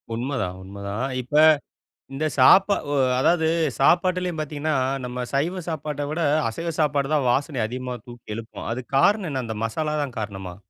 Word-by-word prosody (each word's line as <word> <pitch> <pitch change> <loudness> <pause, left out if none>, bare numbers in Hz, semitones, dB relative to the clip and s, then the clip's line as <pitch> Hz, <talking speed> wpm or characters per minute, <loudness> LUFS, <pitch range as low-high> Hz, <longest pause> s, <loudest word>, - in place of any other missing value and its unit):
உண்மதான் 115 -7 -3
உண்மதான். 100 +4 -5 0.2
இப்ப 125 +4 -7 0.8
இந்த 145 +3 -2
சாப்ப 135 +10 +7 0.2
ஒ - - 0 0.3
அதாவது 160 +3 +3 0.3
சாப்பாட்டிலேயும் 180 +2 +2
பார்த்தீங்கன்னா, 150 0 -2 0.3
நம்ம 125 0 -4
சைவ 170 +7 0
சாப்பாட்ட 150 -2 -3
விட, 155 - -3 0.3
அசைவ 165 +9 -4
சாப்பாடு 145 -2 +1
தான் 140 -4 +1
வாசனை 140 -1 -1
அதிகமா 125 +1 -5
தூக்கி 120 -3 -9
எழுப்புமாம்! 115 +1 -7
அதுக்கு 125 +2 -5
காரணம் 200 +2 +3
என்ன? 130 -2 -2
அந்த 110 -1 -5
மசாலா 150 +7 -2
தான் 130 -5 -7
காரணமா? 95 -4 -6
135 Hz, 150 wpm, -24 LUFS, 120-155 Hz, 0.8 s, சாப்ப